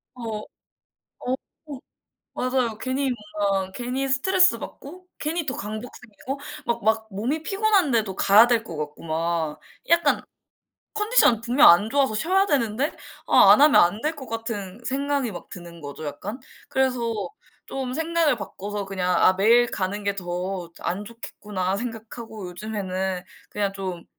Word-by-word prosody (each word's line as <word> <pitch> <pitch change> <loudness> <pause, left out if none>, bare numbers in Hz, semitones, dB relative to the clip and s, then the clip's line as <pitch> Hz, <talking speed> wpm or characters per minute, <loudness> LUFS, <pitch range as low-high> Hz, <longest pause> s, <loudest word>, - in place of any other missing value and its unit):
어 225 -3 -5 0.8
어 250 - -3 0.4
어. - - -8 0.6
맞아요. 250 -3 0
괜히 265 +1 -1 0.3
뭔가 195 -2 0
괜히 255 +4 -3
스트레스받고 360 +2 +1
괜히 320 +2 -2
더 265 - -2
강박 215 +4 -5
생기고 245 +4 -7 0.3
막 235 - -1
막 220 0 +2
몸이 250 +11 -2
피곤한데도 335 - +2
가야 210 +4 +7
될 235 -2 +2
것 165 - -7
같고 150 -1 -6
막. 160 -1 -1 0.3
약간 335 -3 +3 0.7
컨디션 420 - +3
분명 250 - +6
안 205 +6 +6
좋아서 275 -4 +2
쉬어야 375 - +2
되는데 265 - 0 0.3
아 - - +7
안 - - +7
하면 300 0 +7
안 175 +6 +2
될 310 +1 -1
것 265 -4 -9
같은 225 -3 -5
생각이 275 -2 -1
막 175 -2 -9
드는 170 -2 -10
거죠 145 +2 -7
약간. 205 - -6 0.3
그래서 260 -2 +1 0.7
좀 260 -2 -4
생각을 325 -1 +1
바꿔서 205 0 -5
그냥 185 -2 -1
'아 185 - +6
매일 230 +5 +5
가는 200 +2 -2
게 200 0 0
더 180 -1 -4
안 200 +4 -3
좋겠구나.' 200 -4 -4
생각하고 225 -3 -7
요즘에는 190 -2 -3 0.3
그냥 200 -1 -1
좀 185 -3 -5
225 Hz, 280 characters per minute, -24 LUFS, 190-265 Hz, 0.8 s, 가야